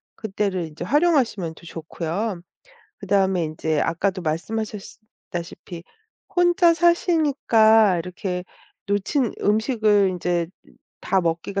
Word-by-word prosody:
그때를 195 -4 -2
인제 155 +2 -8
활용하시면 260 - +1
더 - - -18
좋고요. 170 +4 -4 0.6
그 200 - -10
다음에 190 -3 +2
인제 155 -1 -1
아까도 185 +3 -1
말씀하셨스 210 +7 -4 0.3
다시피 170 0 -7 0.5
혼자 350 -2 +4
사시니까 280 - +3
이렇게 180 +1 -4 0.4
"놓친 205 +5 0
음식을 210 -2 +2
인제 175 -1 -1 0.5
다 190 - +1
먹기가 170 +4 -2
200 Hz, 265 characters per minute, -23 LUFS, 175-225 Hz, 0.6 s, 혼자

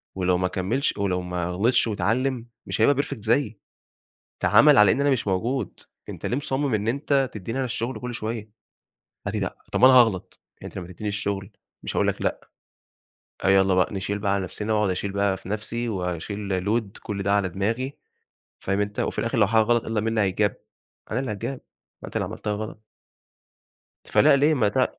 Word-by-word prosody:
ولو 90 -1 +2
ما 90 - +1
كملش 110 +10 -1
ولو 95 -3 0
ما 90 -1 -3
غلِطْش 115 +7 +2
واتعلِّم 120 +3 0 0.2
مش - - -2
هيبقى 140 +4 +4
Perfect 140 -6 -6
زيي، 110 -2 +1 0.8
تَعَامَل 150 -2 +6
على 105 -2 +7
إن 140 - 0
أنا 145 - +3
مش 125 -6 0
موجود، 110 +4 -1 0.3
أنت - - -7
ليه 125 - 0
مُصمِّم 140 -2 -1
إن 105 +1 0
أنت 135 +1 +1
تدّيني 115 +5 -5
أنا 130 - 0
الشُّغل 120 +1 -3
كُلّ 125 0 -4
شوية؟ 110 -1 -5 0.7
قال - - -2
لي - - 0
لأ. - - -3 0.2
طَب - - +1
أنا 130 - +8
هاغْلط، 115 -7 +3 0.2
أنت - - -8
لمّا 90 -2 -6
تدّيني 105 +4 -5
الشُّغل 100 -1 -3 0.3
مش - - -4
هاقول - - +3
لك - - -1
لأ، - - -2 0.9
آه، - - +1
يالّا 95 -1 +5
بقى 90 +3 +2
نشيل 100 +1 -2
بقى 100 -1 +1
على 100 -1 0
نَفْسنا، 105 +4 -3
وأقعد 105 -2 +2
أشيل 100 +2 -3
بقى 100 -1 +1
في 95 - -11
نَفْسي 115 +3 -3
وأشيل 95 0 -3
Load 110 -1 -1
كُلّ 100 -2 -4
ده 100 - +2
على 100 -2 +2
دماغي، 115 - -2 0.6
فاهم 95 +1 -1
أنت؟ 105 0 -2
وفي - - -1
الآخر 115 +1 -1
لو 105 - +5
حاجة 110 +1 +4
غَلَط 120 +1 +1
إلّا 110 -2 -1
مين 115 0 -1
هيتْجاب، 100 0 +1 0.6
أنا 115 - 0
اللي 130 -5 -2
هاتْجاب، 125 +6 -4 0.4
ما - - -6
أنت - - -11
اللي - - 0
عملتها 105 - -4
غَلَط. 110 +1 -6 1.2
فلأ - - +5
ليه 150 +3 +4
ما 110 -7 +2
ت 130 +5 0
105 Hz, 195 wpm, -25 LUFS, 100-120 Hz, 1.2 s, أنا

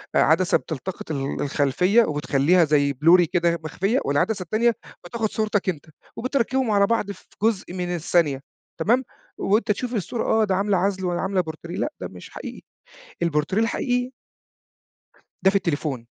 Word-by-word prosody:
عدسة 170 +3 +4
بتلتقط 160 +3 -6
ال 140 -2 -3
الخلفية 155 - +3
وبتخلّيها 150 +2 +2
زي 145 -2 +2
بلوري 165 +6 +5
كده 170 -1 +1
مخفية، 195 - 0
والعدسة 185 +8 0
التانية 225 +6 +2 0.3
بتاخد 220 +3 -2
صورتك 210 -3 0
أنت، 155 -4 -4 0.3
وبتركّبهم 255 -1 0
على 200 -1 +4
بعض 225 -3 0
في 195 - -13 0.2
جزء 215 -5 0
من 180 -1 -2
الثانية، 160 -4 +1 0.4
تمام؟ 240 +10 +2 0.4
وأنت 210 +2 +2
تشوف 245 +4 -3
الصورة 215 +3 -2
آه 220 - +2
ده 195 -3 +1
عاملة 200 0 +1
عزل 190 +1 0
والّا 175 -1 -1
عاملة 190 -1 +1
بورتريه، 170 +1 -7
لأ 300 - -1
ده - - -3
مش - - -12
حقيقي - - -8 0.6
البورتريه 170 +5 +1
الحقيقي 245 +2 0 1.3
ده 190 - +5
في 195 - -2
التليفون. 145 -9 -1
185 Hz, 150 wpm, -23 LUFS, 160-215 Hz, 1.3 s, بلوري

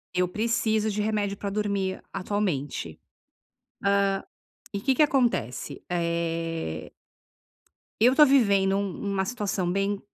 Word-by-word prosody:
Eu 180 0 +2
preciso 220 +1 0
de 210 +1 -1
remédio 205 -2 0
pra 200 0 -4
dormir 200 -2 -1
atualmente, 185 - -2 1.8
hã, 200 - -3
e - - -2
que 265 +6 +2
que 260 - +1
acontece, 230 - +1
eh 165 - -2 1.1
eu 240 +3 +6
estou 300 +1 +8
vivendo 200 -8 +4
um 200 0 -3
uma 190 0 0
situação 200 -5 -1
bem 195 +1 0
200 Hz, 120 wpm, -26 LUFS, 180-215 Hz, 1.8 s, estou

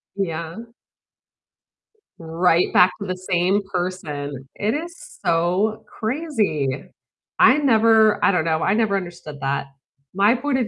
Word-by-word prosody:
Yeah. 170 +2 -4 1.5
Right 165 +1 +1
back 180 +1 +6
to 200 - -4
the 185 0 -3
same 185 +2 +1
person. 145 -7 -4
It 215 +5 -1
is 340 +3 -5 0.3
so 180 +6 +1
crazy. 220 - -2 0.7
I 260 - +6
never 225 -5 +4
I - - +5
don't 175 -4 0
know, 160 -1 0
I 195 - +2
never 220 -3 +1
understood 175 -6 -6
that. 140 0 -2 0.5
My 200 +5 +3
point 265 +1 -1
of 240 - -1
185 Hz, 130 wpm, -21 LUFS, 165-220 Hz, 1.5 s, back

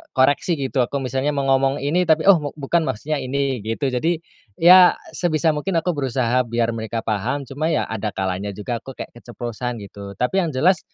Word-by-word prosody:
koreksi 145 +6 +3
gitu 135 -2 -2
aku 140 +3 -4
misalnya 135 +3 -1
mau 140 - 0
ngomong 135 +1 +2
ini 170 +6 +1
tapi 160 0 +3
oh 195 - +8
me 145 -1 -4
bukan 160 +3 0
maksudnya 140 +5 -2
ini 135 0 -1
gitu 115 +5 -1
jadi, 160 +7 -1 0.3
ya 180 +2 +8 0.2
sebisa 165 -2 +1
mungkin 155 +5 -3
aku 180 - 0
berusaha 125 -2 0
biar 115 0 0
mereka 115 +1 -3
paham 115 +7 -1
cuma 140 +4 -3
ya - - +1
ada 110 -2 -3
kalanya 95 +1 -2
juga 110 +4 -3
aku 135 - -10
kayak - - -7
keceplosan 120 -1 -6
gitu 100 0 -9
tapi 155 +10 0
yang 170 -5 -1
jelas 180 +6 +3
135 Hz, 190 wpm, -21 LUFS, 115-155 Hz, 0.3 s, oh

